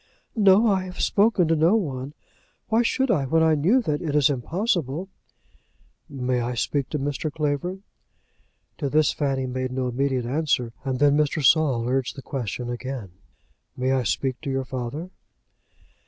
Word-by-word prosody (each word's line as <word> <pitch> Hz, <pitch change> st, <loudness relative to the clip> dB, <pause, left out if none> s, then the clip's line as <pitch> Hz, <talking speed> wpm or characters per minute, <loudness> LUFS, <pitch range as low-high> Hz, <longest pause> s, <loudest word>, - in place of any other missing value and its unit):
"No; 205 Hz, 0 st, +5 dB
I 195 Hz, -4 st, +2 dB
have 180 Hz, -1 st, -9 dB
spoken 205 Hz, -4 st, +3 dB
to 165 Hz, -, +3 dB
no 165 Hz, +6 st, +4 dB
one. 140 Hz, -8 st, -3 dB, 0.5 s
Why 225 Hz, +2 st, +3 dB
should 260 Hz, +2 st, +1 dB
I, 135 Hz, -3 st, +1 dB
when 160 Hz, +4 st, +3 dB
I 160 Hz, -1 st, +4 dB
knew 190 Hz, -, +3 dB
that 150 Hz, -6 st, -1 dB
it 155 Hz, -4 st, -2 dB
is 145 Hz, -1 st, +4 dB
impossible?" 170 Hz, -, -1 dB, 1.0 s
"May 130 Hz, -3 st, -1 dB
I 120 Hz, +1 st, -2 dB
speak 135 Hz, +3 st, -1 dB
to 150 Hz, -, -2 dB
Mr. 145 Hz, +2 st, -2 dB
Clavering?" 155 Hz, +6 st, -2 dB, 1.0 s
To 145 Hz, -4 st, -1 dB
this 155 Hz, +2 st, +3 dB
Fanny 135 Hz, -3 st, -1 dB
made 130 Hz, 0 st, -3 dB
no 130 Hz, -1 st, -1 dB
immediate 130 Hz, 0 st, -1 dB
answer, 125 Hz, -3 st, 0 dB
and 130 Hz, -2 st, -2 dB
then 145 Hz, +1 st, +4 dB
Mr. 150 Hz, -1 st, +1 dB
Saul 130 Hz, -5 st, +3 dB
urged 130 Hz, -1 st, -1 dB
the 135 Hz, -, -9 dB
question 125 Hz, -2 st, -4 dB
again. 120 Hz, -4 st, -5 dB, 0.7 s
"May 130 Hz, +1 st, 0 dB
I 135 Hz, -1 st, +2 dB
speak 130 Hz, +3 st, -2 dB
to 150 Hz, -, -5 dB
your 135 Hz, 0 st, -1 dB
father?" 130 Hz, +8 st, -5 dB
140 Hz, 165 wpm, -24 LUFS, 130-165 Hz, 1.0 s, No